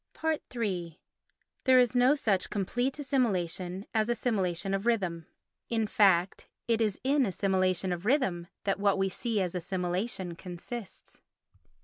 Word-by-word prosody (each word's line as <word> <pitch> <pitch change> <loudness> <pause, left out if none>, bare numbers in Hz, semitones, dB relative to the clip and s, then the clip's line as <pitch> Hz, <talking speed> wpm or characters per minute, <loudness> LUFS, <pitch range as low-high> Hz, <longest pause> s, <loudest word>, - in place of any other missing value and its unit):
iii 180 -7 -3 0.7
There 260 -1 +6
is 250 0 +4
no 250 +4 +5
such 205 -10 0
complete 245 +7 -1
assimilation 195 - -1
as 220 0 +1
assimilation 195 -6 0
of 195 +3 -1
rhythm. 180 -8 0 0.4
In 225 -2 +1
fact 195 -4 +3 0.2
it 230 -1 +2
is 210 -3 0
in 275 +1 +3
assimilation 185 -3 +1
of 175 0 -5
rhythm 215 - +1 0.2
that 195 -1 0
what 200 -1 +3
we 195 0 +1
see 225 +3 -1
as 180 -2 -2
assimilation 180 +1 -2
consists. 185 +5 -9
195 Hz, 130 wpm, -29 LUFS, 180-235 Hz, 0.7 s, There